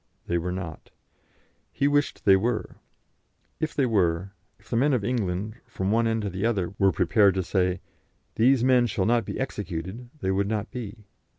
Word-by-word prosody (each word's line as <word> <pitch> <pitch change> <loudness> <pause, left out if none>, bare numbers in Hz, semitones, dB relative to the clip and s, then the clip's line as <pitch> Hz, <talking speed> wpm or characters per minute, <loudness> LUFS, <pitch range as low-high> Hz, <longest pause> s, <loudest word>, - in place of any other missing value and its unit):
They 85 0 0
were 90 +2 -3
not. 90 -4 -6 0.8
He 140 - +1
wished 145 0 0
they 100 -2 +7
were. 110 +4 -1 0.8
If 155 -1 -2
they 140 - +2
were, 95 -5 +1 0.3
if - - -25
the - - -3
men 140 +5 +3
of 115 -6 0
England, 105 -2 -2
from 100 -4 -2
one 115 +1 +3
end 110 -1 0
to 100 - -2
the 95 +2 -4
other, 100 -6 0
were 95 -1 +5
prepared 100 -3 +3
to 95 - 0
say, 90 0 0 0.5
'These 125 +2 +4
men 125 -2 +4
shall 95 -3 -1
not 120 0 +2
be - - -5
executed,' 105 -1 -5
they 95 -7 0
would 100 +1 +1
not 110 +1 -2
be. 110 -3 -7
105 Hz, 185 wpm, -26 LUFS, 95-120 Hz, 0.8 s, they